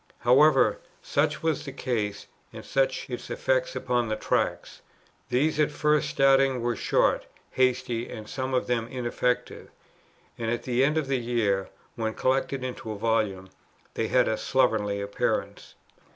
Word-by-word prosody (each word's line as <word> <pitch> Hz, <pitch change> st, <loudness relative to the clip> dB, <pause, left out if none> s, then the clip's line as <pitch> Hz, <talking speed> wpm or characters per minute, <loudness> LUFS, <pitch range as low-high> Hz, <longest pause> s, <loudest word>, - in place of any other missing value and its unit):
However, 135 Hz, +3 st, +5 dB, 0.2 s
such 150 Hz, +2 st, 0 dB
was 160 Hz, -2 st, 0 dB
the 140 Hz, -, -6 dB
case, 110 Hz, -7 st, -3 dB, 0.3 s
and -, -, -10 dB
such -, -, 0 dB
its -, -, -6 dB
effect -, -, 0 dB
upon 120 Hz, -2 st, 0 dB
the 110 Hz, -, 0 dB
Tracts. -, -, -2 dB, 0.5 s
These 145 Hz, +5 st, +1 dB
at 150 Hz, -, +3 dB
first 150 Hz, 0 st, +1 dB
starting 135 Hz, -1 st, +3 dB
were 120 Hz, -1 st, 0 dB
short, -, -, +1 dB, 0.2 s
hasty, 125 Hz, -2 st, 0 dB
and 110 Hz, -3 st, -8 dB
some 130 Hz, +1 st, -3 dB
of 125 Hz, -, +1 dB
them 120 Hz, -2 st, -1 dB
ineffective; 125 Hz, 0 st, -2 dB, 0.7 s
and 115 Hz, -1 st, -2 dB
at 120 Hz, +1 st, -2 dB
the 125 Hz, +1 st, +1 dB
end 150 Hz, +3 st, +2 dB
of 155 Hz, -, +1 dB
the 135 Hz, -1 st, 0 dB
year, 110 Hz, -5 st, 0 dB, 0.3 s
when 110 Hz, -1 st, -2 dB
collected 135 Hz, 0 st, 0 dB
into 125 Hz, -3 st, -5 dB
a 105 Hz, -, -5 dB
volume, 105 Hz, -4 st, 0 dB, 0.4 s
they 110 Hz, -, -1 dB
had 125 Hz, +1 st, +3 dB
a 110 Hz, -, 0 dB
slovenly 110 Hz, -6 st, +1 dB
appearance. 100 Hz, 0 st, -3 dB
125 Hz, 150 wpm, -26 LUFS, 115-135 Hz, 0.7 s, However